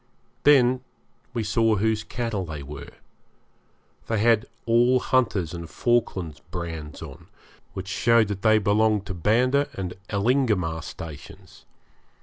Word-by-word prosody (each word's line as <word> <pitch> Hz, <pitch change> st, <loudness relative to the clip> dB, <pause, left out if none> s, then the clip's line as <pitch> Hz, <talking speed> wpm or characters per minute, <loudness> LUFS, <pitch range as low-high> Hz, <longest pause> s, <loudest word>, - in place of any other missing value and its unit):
Then 130 Hz, -3 st, +5 dB, 0.5 s
we 120 Hz, -3 st, -2 dB
saw 110 Hz, +1 st, +2 dB
whose 110 Hz, +1 st, 0 dB
cattle 115 Hz, -6 st, -3 dB
they 75 Hz, -4 st, -6 dB
were; 70 Hz, 0 st, -9 dB, 1.2 s
they 115 Hz, -, 0 dB
had 110 Hz, 0 st, +3 dB, 0.2 s
all 120 Hz, +2 st, +4 dB
Hunter's 105 Hz, -11 st, 0 dB
and 85 Hz, -1 st, -7 dB
Falkland's 95 Hz, -10 st, -1 dB
brands 80 Hz, -4 st, -6 dB
on, -, -, -11 dB, 0.5 s
which 95 Hz, 0 st, -6 dB
showed 115 Hz, +3 st, +3 dB
that 100 Hz, -1 st, -4 dB
they 110 Hz, -1 st, +5 dB
belonged 105 Hz, 0 st, +2 dB
to 95 Hz, -, -5 dB
Banda 125 Hz, -, +2 dB
and 90 Hz, -2 st, -4 dB, 0.2 s
Elingamah 100 Hz, -7 st, +1 dB
stations. 75 Hz, -2 st, -10 dB
105 Hz, 125 wpm, -25 LUFS, 90-120 Hz, 1.2 s, Then